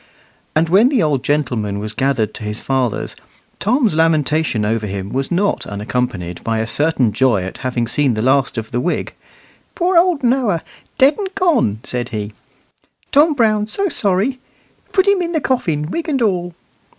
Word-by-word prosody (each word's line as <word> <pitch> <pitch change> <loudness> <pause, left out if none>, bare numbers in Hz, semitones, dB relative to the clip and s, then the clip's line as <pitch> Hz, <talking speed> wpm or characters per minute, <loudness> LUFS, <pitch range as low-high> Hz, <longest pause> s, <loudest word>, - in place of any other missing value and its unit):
And 160 +2 +3
when 200 +9 +5
the 265 - +2
old 145 -5 0
gentleman 120 -9 -1
was 105 +1 -5
gathered 125 -5 0
to - - -8
his 105 +1 -4
fathers, 130 -5 -2 0.4
Tom's 230 - +2
lamentation 155 -7 +1
over 110 0 -1
him 100 0 -5
was 135 +1 -1
not 200 +4 0
unaccompanied 100 -4 -3
by 115 0 -1
a 110 - 0
certain 135 -2 +1
joy 115 -4 +2
at 95 - -7
having 125 -2 -1
seen 130 +1 +2
the 110 - -2
last 135 0 +2
of 110 -1 -5
the 120 - -1
wig. 175 +7 -2 0.6
"Poor 355 0 +3
old 340 -5 +1
Noah, 240 -9 +1 0.3
dead 280 +6 +4
and 395 -2 -2
gone," 315 - +1
said 120 -1 -4
he; 105 -1 -5 0.8
"Tom 300 +2 +4
Brown 215 -4 +2
so 395 - -1
sorry. 210 - +1 0.5
Put 380 0 +2
him 400 -2 +4
in 345 0 -2
the 320 - +2
coffin, 165 - -1
wig 335 0 -3
and 270 -5 +1
all." 175 -5 -1
150 Hz, 175 wpm, -18 LUFS, -, 0.8 s, when